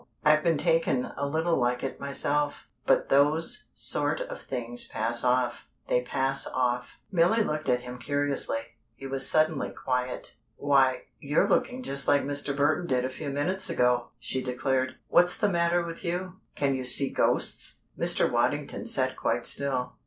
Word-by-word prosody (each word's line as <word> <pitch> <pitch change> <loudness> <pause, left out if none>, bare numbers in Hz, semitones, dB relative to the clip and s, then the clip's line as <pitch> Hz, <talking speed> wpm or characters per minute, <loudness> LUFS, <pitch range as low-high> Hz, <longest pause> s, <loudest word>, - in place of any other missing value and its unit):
I've 155 0 +5
been 165 -3 +2
taken 165 -5 +1
a 140 - -2
little 160 +3 0
like 125 0 0
it 135 - -4
myself, 145 +1 -1 0.2
but - - +3
those 145 +4 +2
sort - - 0
of - - -6
things 245 -1 -3
pass 115 - -1
off 125 -1 0 0.2
they 125 - +3
pass 135 +2 0
off." 125 -1 -1
Milly 190 +5 +3
looked 155 -4 -3
at 125 0 +2
him 125 0 -8
curiously. 140 -3 -1 0.3
He 135 - -10
was 135 -1 0
suddenly 155 -2 +2
quiet. 125 -1 -3 0.2
"Why, 135 -2 +2 0.2
you're 150 +7 +1
looking 255 +4 0
just 140 - -3
like 145 - +4
Mr. 140 0 -3
Burton 155 +4 +1
did 125 -1 +1
a - - -2
few 145 +2 -5
minutes 180 +8 -1
ago!" 125 -1 +2
she 130 - -3
declared. 130 +1 -1
"What's 175 +1 +4
the 210 - +2
matter 170 -1 +2
with 165 0 -7
you? 180 +1 -3 0.2
Can 140 -1 +1
you 130 -1 -3
see 135 +2 +5
ghosts?" - - 0
Mr. - - +1
Waddington - - -1
sat - - 0
quite - - -1
still. 130 -3 -2
140 Hz, 165 wpm, -27 LUFS, 130-165 Hz, 0.3 s, I've